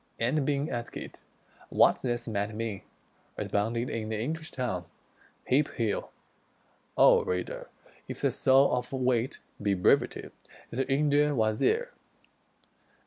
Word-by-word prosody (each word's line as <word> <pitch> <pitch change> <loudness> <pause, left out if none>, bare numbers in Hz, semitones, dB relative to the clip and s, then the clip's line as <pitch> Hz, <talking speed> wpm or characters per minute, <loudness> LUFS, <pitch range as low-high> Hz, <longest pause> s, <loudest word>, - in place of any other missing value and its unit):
_" - - -39 0.2
and 135 +5 +1
being 145 0 0
asked 120 0 -6 0.4
what - - +4
this 120 -2 -2
Might 105 -1 -2
mean, 110 -3 -3 0.6
responded 115 +4 -1
in 110 -1 -3
the 110 -1 -2
English 155 +7 -3
tongue: 95 -10 -3 0.6
"Heap 140 +3 +2
hell!" 110 -3 -1 0.9
O - - +7
reader! 90 0 -3 0.4
if - - -7
the - - +2
soul 135 +1 +4
of 125 0 -4
wit 130 -2 0 0.2
Be 100 -1 +1
brevity, 90 - +2 0.4
this 130 +3 -1
Indian 145 +1 +2
was 110 -1 +1
there. - - +1
120 Hz, 130 wpm, -29 LUFS, 110-140 Hz, 0.9 s, O